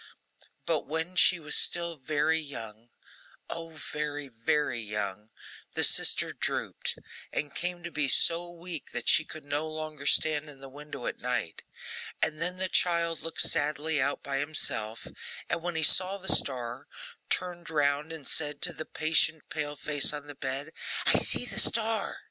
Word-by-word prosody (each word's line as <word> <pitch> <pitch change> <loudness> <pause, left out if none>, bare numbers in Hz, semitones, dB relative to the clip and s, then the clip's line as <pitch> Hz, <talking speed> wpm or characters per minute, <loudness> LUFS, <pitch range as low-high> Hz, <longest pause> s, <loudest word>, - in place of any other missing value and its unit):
But - - 0
while 160 +4 -3
she 180 -1 +5
was 150 -2 +2
still 170 -1 +2
very 155 +3 +1
young, 115 -6 -8 0.6
oh, 165 -1 -7 0.2
very, 145 -1 -3
very 120 +2 0
young, 105 -1 -4 0.5
the - - +2
sister - - +3
drooped, - - -1 0.3
and 145 -2 -2
came 175 0 -3
to 170 - -5
be 150 -2 +1
so 170 +5 +4
weak 170 -2 -7
that 120 -1 -3
she 160 - +6
could 155 -1 -10
no 145 +2 -1
longer 155 -2 -5
stand 155 -1 +3
in 140 -2 -13
the 135 0 -10
window 145 -2 -8
at - - -3
night; 125 -9 -2 0.6
and 155 0 0
then 180 +2 -1
the 190 0 +1
child 170 -2 +1
looked 165 0 0
sadly 150 +1 +2
out - - -1
by 135 -1 -2
himself, 115 -7 -1 0.4
and - - -1
when 175 0 -3
he 160 - +1
saw 185 +5 +5
the 190 -1 +4
star, 125 -1 -1 0.4
turned 175 -1 -1
round 150 0 +1
and 160 -4 -7
said 150 -2 0
to - - +3
the 155 - -5
patient 160 0 +1
pale 150 -1 -3
face 145 0 +2
on 145 -1 -6
the 145 - -8
bed, 135 +2 -4 0.3
'I - - +6
see - - 0
the - - -1
star! 225 -1 +2
150 Hz, 165 wpm, -29 LUFS, 140-165 Hz, 0.6 s, she